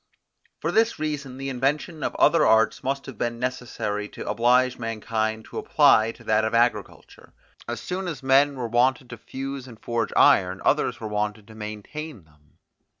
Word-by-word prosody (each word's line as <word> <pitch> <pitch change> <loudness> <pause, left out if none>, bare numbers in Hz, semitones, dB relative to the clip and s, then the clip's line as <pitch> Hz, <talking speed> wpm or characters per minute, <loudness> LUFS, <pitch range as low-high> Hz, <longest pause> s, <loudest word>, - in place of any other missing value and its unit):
For - - -1
this 225 +1 +2
reason 145 -4 -4
the 135 0 -4
invention 145 +5 -1
of - - -2
other 165 - +4
arts 110 +5 +3
must 135 +1 -2
have 135 - -10
been 120 0 -2
necessary 115 -4 -3
to - - -9
oblige 125 +2 +2
mankind 110 -1 -2
to - - -6
apply 110 +1 +4
to - - -17
that 110 0 +2
of 110 +1 0
agriculture. 120 +1 -1 0.3
As 120 -1 -4
soon 185 +7 -4
as 150 -7 -5
men 140 +2 +4
were 125 -3 -3
wanted 125 +2 +1
to 115 - -7
fuse 135 +1 -6
and 115 -3 -13
forge 115 -2 -2
iron, 95 0 +4
others - - +1
were 110 - -5
wanted 105 0 -3
to - - -12
maintain 110 - -7
them. 75 -1 -28
120 Hz, 175 wpm, -24 LUFS, 110-135 Hz, 0.3 s, other